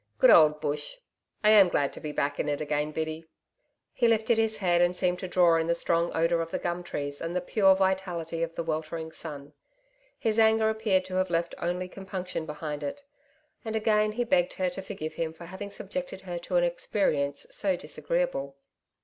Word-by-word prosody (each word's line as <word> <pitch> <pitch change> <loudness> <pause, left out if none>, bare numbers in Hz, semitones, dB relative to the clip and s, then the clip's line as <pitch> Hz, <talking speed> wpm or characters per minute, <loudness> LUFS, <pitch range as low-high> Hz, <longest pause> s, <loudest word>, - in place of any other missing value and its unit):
Good - - +7
old 150 -1 +6
Bush! 150 - -3 0.5
I 210 - +6
am 200 -4 +7
glad 140 -4 0
to - - -7
be 150 - -5
back 145 0 -1
in 150 - 0
it 145 - -1
again, 150 0 -1
Biddy.' 160 +1 -4 0.6
He 240 - +2
lifted 225 0 +2
his 220 -1 +2
head 175 -3 +2
and 175 +1 +3
seemed 180 -1 0
to 185 - -4
draw 175 -2 +4
in 165 0 0
the 170 - +2
strong 170 0 +1
odour 165 +1 +2
of 165 - -4
the - - -2
gum 175 0 -2
trees 145 -4 -5
and 165 +2 -4
the - - +2
pure 190 +1 +4
vitality 185 -4 -1
of 165 0 -2
the 170 - -2
weltering 160 0 -3
sun. 145 -3 -8 0.6
His 225 -3 0
anger 220 0 +4
appeared 215 -4 +1
to 185 - -4
have 185 0 +1
left 170 0 0
only 180 +1 -2
compunction 185 -3 -5
behind 150 -1 -5
it. 145 - -5 0.6
And 220 -1 -4
again 215 -1 +2
he 245 +2 0
begged 265 +2 +2
her 185 -1 -1
to 195 - -6
forgive 190 -5 -6
him 160 -1 -3
for 170 +1 -11
having 190 +3 -7
subjected 205 +2 -6
her 175 -2 -5
to 180 +1 -4
an 175 - +4
experience 165 -5 0
so 195 -3 +1
disagreeable. 155 -2 -2
175 Hz, 200 wpm, -28 LUFS, 160-195 Hz, 0.6 s, Good